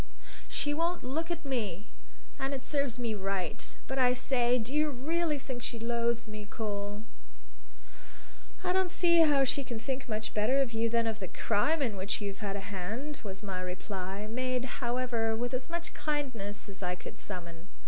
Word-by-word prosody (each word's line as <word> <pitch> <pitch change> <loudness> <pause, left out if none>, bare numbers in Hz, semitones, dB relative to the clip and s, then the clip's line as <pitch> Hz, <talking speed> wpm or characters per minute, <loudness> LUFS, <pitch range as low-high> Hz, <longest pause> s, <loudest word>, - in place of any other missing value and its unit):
So - - -24 0.4
she 290 - +1
won't 335 +3 +1
look 315 +6 -1
at 340 -2 -3
me. 215 -8 -1 0.5
And 270 +1 0
it 265 - -6
serves 280 -5 +1
me 235 -3 0
right. 195 -4 -2
But 265 0 -1
I 250 -1 +6
say 250 -1 +3
do 240 +2 -3
you 305 0 +4
really 305 +4 +1
think 260 -3 -5
she 235 - -3
loathes 235 0 +1
me, 215 -1 -6
Cole?" 205 -1 -3 1.6
"I 360 -1 +2
don't 375 -1 +3
see 340 -1 +5
how 295 -4 +7
she 275 +1 +2
can 240 -3 -4
think 260 +3 -3
much 215 0 -2
better 220 +6 +3
of 260 -4 +2
you 225 +1 +2
than 230 0 +3
of 220 -1 -1
the 190 - -3
crime 280 - +2
in 225 -6 0
which 195 +1 0
you've 200 -2 -4
had 200 -3 -2
a 200 - -2
hand," 220 +11 -3
was 195 -1 -6
my 190 -3 -2
reply, 190 +2 -4
made, 255 +2 0 0.2
however, 240 -2 +1
with 245 +3 -1
as 255 +4 -1
much 340 +1 -1
kindness 255 -10 -2
as 200 -1 -8
I 180 -1 0
could - - -9
summon. 170 -3 -5
235 Hz, 190 wpm, -32 LUFS, 205-275 Hz, 1.6 s, how